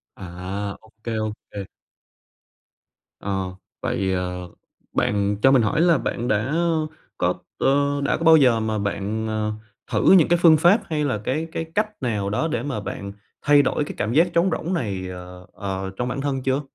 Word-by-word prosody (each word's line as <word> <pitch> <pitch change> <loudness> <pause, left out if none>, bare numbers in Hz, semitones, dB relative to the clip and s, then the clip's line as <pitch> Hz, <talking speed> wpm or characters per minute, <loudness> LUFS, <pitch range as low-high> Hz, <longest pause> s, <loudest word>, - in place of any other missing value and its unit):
À! 95 +3 -5
Ô 110 - -20
kê, 115 -2 -2
ô 110 0 -1 0.2
kê. 100 -2 -5 1.6
Ờ, 95 -2 -3 0.3
vậy, 95 -1 -1
ờ, 90 -1 -3 0.4
bạn 100 0 +1
cho 135 - +6
mình 130 - +5
hỏi 150 +8 +1
là 170 -2 +5
bạn 120 -1 -3
đã 110 +7 0 0.6
có 90 0 +2 0.2
ờ, 140 +1 +2
đã 140 - +1
có 165 - -5
bao 160 -1 +8
giờ 125 -6 +4
mà 110 -1 -1
bạn, 100 +2 -2
ờ, 110 0 -1 0.4
thử - - +4
những 185 -5 +7
cái 175 - +3
phương 160 -3 +7
pháp 175 +8 +5
hay 150 -2 0
là 130 -6 0
cái 155 +8 -1
cái 165 - -3
cách 215 +1 +2
nào 105 -5 -1
đó 110 +10 0
để 120 -6 -2
mà 140 -6 -3
bạn 100 -1 -6 0.3
thay 145 0 +6
đổi 145 +2 0
cái - - -6
cảm 110 +3 -1
giác 165 +4 +5
trống 170 +3 +3
rỗng 170 +3 -2
này, 100 - -2
ờ, 90 0 -9
ờ, 95 -1 -4
trong 125 - -1
bản 130 +3 -3
thân 135 -2 -2
chưa? 135 +2 +1
115 Hz, 190 wpm, -23 LUFS, 100-145 Hz, 1.6 s, bao